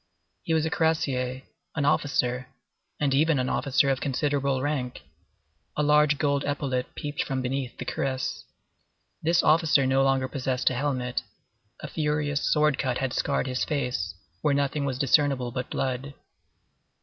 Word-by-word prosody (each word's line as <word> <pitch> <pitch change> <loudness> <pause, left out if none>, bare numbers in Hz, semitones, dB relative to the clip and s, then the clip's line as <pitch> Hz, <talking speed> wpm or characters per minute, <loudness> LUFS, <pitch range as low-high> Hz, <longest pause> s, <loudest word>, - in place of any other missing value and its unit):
He 160 - 0
was 160 0 +2
a 160 - -2
cuirassier, 135 -8 0 0.3
an 145 -3 0
officer, 130 -4 +1 0.5
and 140 -2 +1
even 155 +2 +3
an 125 0 0
officer 140 0 +2
of 135 - -1
considerable 140 -1 0
rank; 130 - -2 0.7
a 150 - +2
large 150 0 +4
gold 140 -1 +1
epaulette 135 -3 -2
peeped 145 0 -3
from 130 -1 -2
beneath 130 -1 -3
the - - -5
cuirass; 130 -1 -2 0.8
this 170 +2 +3
officer 155 -3 +4
no 135 +1 +3
longer 135 -1 +2
possessed 130 -1 0
a - - -1
helmet. 125 -2 -1 0.6
A - - -5
furious 150 -1 -1
sword 150 -2 +3
cut 130 -2 0
had 130 -1 -2
scarred - - 0
his 130 -1 -1
face, 125 - -2 0.3
where 145 -2 +2
nothing 140 +1 0
was 130 -2 -2
discernible 135 -2 +2
but 125 +1 -4
blood. 135 +1 -3
140 Hz, 150 wpm, -26 LUFS, 130-150 Hz, 0.8 s, large